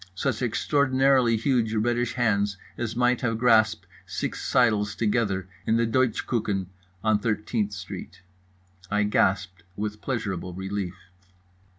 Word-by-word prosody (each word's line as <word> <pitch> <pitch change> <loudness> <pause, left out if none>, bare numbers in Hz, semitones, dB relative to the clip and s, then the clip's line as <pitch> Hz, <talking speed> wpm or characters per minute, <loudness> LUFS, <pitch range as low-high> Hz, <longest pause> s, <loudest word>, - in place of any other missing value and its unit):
Such 125 +3 -1
extraordinarily 130 -1 +3
huge 115 -2 +1
reddish 120 +2 0
hands 105 -4 +1 0.2
as 115 -1 -3
might 125 +1 +2
have 115 -3 0
grasped 110 -4 +3 0.2
six - - -4
seidels 105 -5 +2
together 105 -4 0 0.2
in 110 - +3
the 115 - +2
Deutsche 125 0 +1
Küchen 105 -5 -1 0.4
on 110 -1 +3
13th 105 -1 -1
street. 95 -2 -8 0.7
I 105 0 +2
gasped 95 -3 +1
with 105 +1 -4
pleasurable 95 -8 -3
relief. 95 -1 -4
110 Hz, 120 wpm, -26 LUFS, 100-120 Hz, 0.7 s, extraordinarily